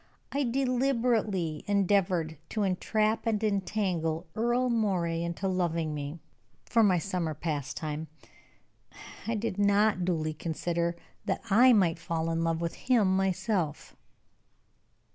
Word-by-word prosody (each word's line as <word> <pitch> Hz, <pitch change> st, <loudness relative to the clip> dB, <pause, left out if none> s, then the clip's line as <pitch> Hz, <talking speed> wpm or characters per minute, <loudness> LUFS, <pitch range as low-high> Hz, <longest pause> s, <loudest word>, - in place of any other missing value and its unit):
I 285 Hz, -, 0 dB
deliberately 240 Hz, -, 0 dB
endeavored 185 Hz, -5 st, +1 dB
to 215 Hz, -, -1 dB
entrap 215 Hz, +4 st, 0 dB
and 220 Hz, -1 st, 0 dB
entangle 185 Hz, -5 st, -1 dB
Earle 240 Hz, +3 st, +1 dB
Moray 180 Hz, -7 st, 0 dB
into 170 Hz, +3 st, -2 dB
loving 170 Hz, -4 st, 0 dB
me, 145 Hz, +2 st, -5 dB, 0.5 s
for 230 Hz, -, +3 dB
my 195 Hz, -4 st, +4 dB
summer 170 Hz, -3 st, -2 dB
pastime. 150 Hz, 0 st, -3 dB, 1.2 s
I 230 Hz, -, 0 dB
did 210 Hz, -2 st, -3 dB
not 205 Hz, -1 st, +3 dB
duly 160 Hz, -3 st, 0 dB
consider 170 Hz, +2 st, -2 dB, 0.3 s
that -, -, -2 dB
I 245 Hz, +5 st, +7 dB
might 175 Hz, -6 st, +3 dB
fall 165 Hz, -1 st, -2 dB
in 165 Hz, 0 st, 0 dB
love 165 Hz, 0 st, 0 dB
with 170 Hz, -1 st, -2 dB
him 215 Hz, -7 st, +2 dB
myself." 190 Hz, -4 st, -1 dB
185 Hz, 120 wpm, -29 LUFS, 165-215 Hz, 1.2 s, I